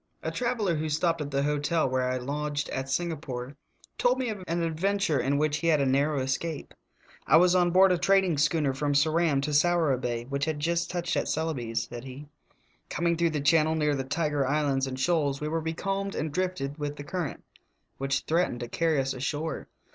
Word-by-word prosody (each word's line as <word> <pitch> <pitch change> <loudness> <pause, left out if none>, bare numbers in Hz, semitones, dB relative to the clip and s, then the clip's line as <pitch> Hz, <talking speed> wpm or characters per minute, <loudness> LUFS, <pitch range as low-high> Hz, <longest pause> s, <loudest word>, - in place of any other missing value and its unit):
A - - -2
traveler 230 -9 0
who 155 +1 -2
stopped 165 +2 +1
at 145 - -3
the 140 0 0
hotel 150 +2 +1
where 130 0 0
I 130 - 0
lodged 145 +3 -3
at 130 0 -4
Singapore 140 -4 -3 0.4
told 250 +1 +3
me 255 -2 -1
of 205 -4 -5
an 170 +1 -1
adventure 165 0 0
in 140 +3 +1
which 150 0 +1
he 165 - -2
had 155 -2 +4
a 140 - +2
narrow 140 +2 +2
escape: 140 +4 -3 0.5
"I 150 - +7
was 180 +1 +5
on 180 -1 +4
board 185 +2 +5
a 180 - +2
trading 190 -6 +3
schooner 150 -2 +2
from 145 +2 -1
Ceram 155 -1 +3
to 150 +1 -2
Sourabaya, 140 -7 +2
which 140 +1 -1
had 155 -2 -2
just 170 +2 0
touched 175 -1 -2
at - - 0
Celebes," 130 -8 -2
said 120 0 -7
he; 135 +2 -9 0.6
"coming 170 0 0
through 170 0 +2
the 150 -2 -2
channel 160 +1 +3
near 150 -2 +1
the 135 -2 -1
Tiger 145 +1 0
Islands 140 -2 +1
and 130 0 -5
Shoals, 145 -2 +1
we 150 - -3
were 165 +1 -1
becalmed 195 +5 -3
and 155 0 -2
drifted 180 -5 -2
with 145 0 -3
the 145 - -8
current, 165 +1 -4 0.6
which 135 0 0
threatened 160 -7 0
to 120 - -5
earry 160 -3 +3
us 135 0 -1
ashore. 145 +4 -3
150 Hz, 200 wpm, -28 LUFS, 140-170 Hz, 0.6 s, I